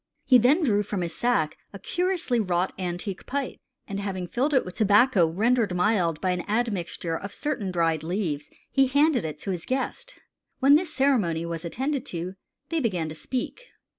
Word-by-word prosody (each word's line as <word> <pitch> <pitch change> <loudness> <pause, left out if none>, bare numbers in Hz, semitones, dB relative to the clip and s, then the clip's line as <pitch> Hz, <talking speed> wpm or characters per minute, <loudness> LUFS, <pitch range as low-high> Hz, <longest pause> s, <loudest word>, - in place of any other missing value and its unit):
He 255 -2 +7
then 280 +9 +4
drew 210 -7 +3
from 205 -2 -3
his 170 -1 -2
sack 235 -11 0 0.2
a - - -6
curiously 350 - 0
wrought 185 -3 0
antique 180 +2 -4
pipe, 275 0 -3 0.3
and 200 0 -4
having 190 -2 -3
filled 250 - 0
it 265 -3 +3
with 180 - -7
tobacco 205 -3 +4
rendered 215 +2 +1
mild 180 -4 +2
by 185 - 0
an 180 -1 -1
admixture 200 -7 -1
of 200 +4 -5
certain 205 -5 -3
dried 165 -3 +1
leaves, 160 -4 -2 0.2
he 270 -1 +4
handed 285 - +3
it 155 -1 -4
to 195 - -2
his 175 -3 -4
guest. 265 - -3 0.4
"When 275 +1 +6
this 315 +2 +3
ceremony 220 - +1
was 170 0 -5
attended 265 - -2
to, 175 +2 -4 0.4
they 330 - 0
began 180 - -1
to - - -6
speak. 260 - -4
205 Hz, 180 wpm, -26 LUFS, 175-260 Hz, 0.4 s, He